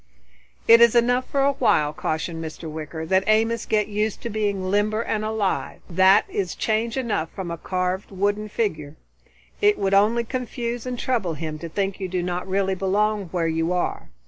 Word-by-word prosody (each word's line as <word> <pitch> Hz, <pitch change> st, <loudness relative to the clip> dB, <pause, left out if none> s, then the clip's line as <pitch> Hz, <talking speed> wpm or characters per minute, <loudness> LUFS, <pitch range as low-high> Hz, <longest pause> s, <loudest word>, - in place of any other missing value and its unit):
"It 230 Hz, +1 st, +8 dB
is 235 Hz, 0 st, +6 dB
enough 245 Hz, +2 st, +3 dB
for 280 Hz, -, +1 dB
a 280 Hz, -, +4 dB
while," 155 Hz, -, +2 dB
cautioned 160 Hz, +2 st, -3 dB
Mr. 160 Hz, +1 st, -7 dB
Wicker, 160 Hz, +1 st, -6 dB
"that 190 Hz, +3 st, +2 dB
Amos 225 Hz, +2 st, +2 dB
get 210 Hz, -1 st, +1 dB
used 210 Hz, 0 st, -2 dB
to 235 Hz, -, -4 dB
being 200 Hz, -3 st, -1 dB
limber 210 Hz, +2 st, +1 dB
and 215 Hz, -1 st, -2 dB
alive. 215 Hz, -3 st, -2 dB
That 190 Hz, +4 st, +5 dB
is 190 Hz, -3 st, -3 dB
change 225 Hz, +2 st, -1 dB
enough 220 Hz, -11 st, -1 dB
from 185 Hz, -3 st, -5 dB
a 170 Hz, -, -4 dB
carved 185 Hz, +2 st, -2 dB
wooden 205 Hz, +2 st, -1 dB
figure. 155 Hz, -10 st, -2 dB, 0.7 s
It 415 Hz, 0 st, +4 dB
would 195 Hz, 0 st, 0 dB
only 215 Hz, +4 st, +4 dB
confuse 245 Hz, -1 st, -4 dB
and 250 Hz, -1 st, -3 dB
trouble 225 Hz, -11 st, -1 dB
him 155 Hz, 0 st, -5 dB
to 170 Hz, -, -6 dB
think 195 Hz, +3 st, -2 dB
you 190 Hz, -, -3 dB
do 180 Hz, -1 st, -2 dB
not 180 Hz, +1 st, -3 dB
really 195 Hz, 0 st, 0 dB
belong 200 Hz, +2 st, 0 dB
where 170 Hz, -1 st, -2 dB
you 165 Hz, +2 st, 0 dB
are. 180 Hz, -, -2 dB
200 Hz, 185 wpm, -23 LUFS, 175-220 Hz, 0.7 s, It